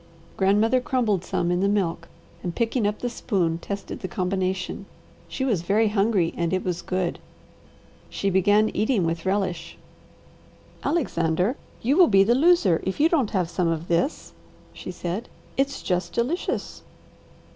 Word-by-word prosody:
Grandmother 210 Hz, +6 st, +3 dB
crumbled 225 Hz, -8 st, 0 dB
some 175 Hz, 0 st, -1 dB
in 175 Hz, -, +1 dB
the 195 Hz, -, +2 dB
milk 170 Hz, -5 st, -1 dB, 0.3 s
and 175 Hz, -2 st, -4 dB
picking 230 Hz, -1 st, +1 dB
up 210 Hz, +1 st, -1 dB
the 245 Hz, -, -3 dB
spoon 180 Hz, -9 st, -1 dB
tested 200 Hz, +2 st, -6 dB
the 185 Hz, -, -4 dB
combination. 185 Hz, 0 st, -2 dB, 0.4 s
She 265 Hz, -, -3 dB
was 215 Hz, -10 st, +1 dB
very 210 Hz, +5 st, +2 dB
hungry, 200 Hz, -4 st, +1 dB
and 170 Hz, -1 st, -1 dB
it 185 Hz, -, 0 dB
was 175 Hz, -1 st, -2 dB
good. 185 Hz, -2 st, -2 dB, 0.9 s
She 200 Hz, -, -1 dB
began 205 Hz, +3 st, +4 dB
eating 215 Hz, -2 st, +1 dB
with 165 Hz, +2 st, -2 dB
relish. 185 Hz, -4 st, -2 dB, 1.1 s
"Alexander, 190 Hz, -, 0 dB, 0.3 s
you 270 Hz, +7 st, +2 dB
will 365 Hz, -, +7 dB
be 195 Hz, -2 st, +5 dB
the 225 Hz, +4 st, +3 dB
loser 265 Hz, -, +4 dB
if 190 Hz, -, -3 dB
you 315 Hz, +3 st, +5 dB
don't 280 Hz, -11 st, +2 dB
have 185 Hz, -4 st, 0 dB
some 170 Hz, +1 st, -1 dB
of 165 Hz, 0 st, -2 dB
this," 170 Hz, -, -1 dB, 0.4 s
she -, -, -9 dB
said. 180 Hz, +5 st, -4 dB, 0.3 s
"It's 275 Hz, +1 st, -1 dB
just 180 Hz, 0 st, -1 dB
delicious!" 265 Hz, +10 st, -2 dB
195 Hz, 155 wpm, -24 LUFS, 175-230 Hz, 1.1 s, will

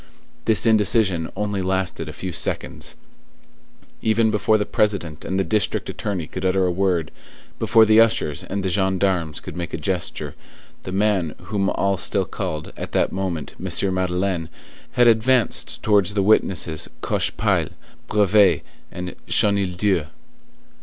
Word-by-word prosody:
This 110 Hz, 0 st, +3 dB
indecision 105 Hz, -6 st, +2 dB
only 100 Hz, -1 st, -2 dB
lasted 95 Hz, -4 st, -2 dB
a -, -, -7 dB
few 90 Hz, +3 st, -5 dB
seconds. -, -, -2 dB, 1.1 s
Even 110 Hz, 0 st, +2 dB
before 105 Hz, +1 st, +2 dB
the 105 Hz, -, -1 dB
President 90 Hz, -7 st, -1 dB
and 95 Hz, -, -2 dB
the -, -, +2 dB
district 100 Hz, +4 st, 0 dB
attorney 95 Hz, -6 st, -3 dB
could -, -, -7 dB
utter 95 Hz, 0 st, +2 dB
a 90 Hz, -, +1 dB
word, 90 Hz, -4 st, 0 dB, 0.5 s
before 115 Hz, -1 st, +5 dB
the 110 Hz, +1 st, +6 dB
ushers 100 Hz, -10 st, +1 dB
and 100 Hz, 0 st, -4 dB
the 95 Hz, -, -1 dB
gendarmes 95 Hz, -4 st, 0 dB
could -, -, -9 dB
make 85 Hz, -2 st, -4 dB
a -, -, -4 dB
gesture, 85 Hz, +1 st, -3 dB, 0.5 s
the 95 Hz, -, -7 dB
man 95 Hz, -5 st, +1 dB
whom 100 Hz, -3 st, -1 dB
all 100 Hz, 0 st, 0 dB
still -, -, +1 dB
called, 75 Hz, 0 st, -5 dB
at -, -, -7 dB
that -, -, +2 dB
moment, 90 Hz, -6 st, -3 dB
M. 95 Hz, +1 st, +1 dB
Madeleine, 90 Hz, -2 st, -1 dB, 0.4 s
had 125 Hz, 0 st, +4 dB
advanced 120 Hz, +2 st, +2 dB
towards 100 Hz, -2 st, +3 dB
the 100 Hz, -, +2 dB
witnesses 90 Hz, -6 st, +1 dB
Cochepaille, -, -, 0 dB, 0.4 s
Brevet, 100 Hz, -5 st, +4 dB, 0.3 s
and 90 Hz, 0 st, -6 dB
Chenildieu. 95 Hz, -4 st, +1 dB
95 Hz, 140 wpm, -22 LUFS, 90-105 Hz, 1.1 s, the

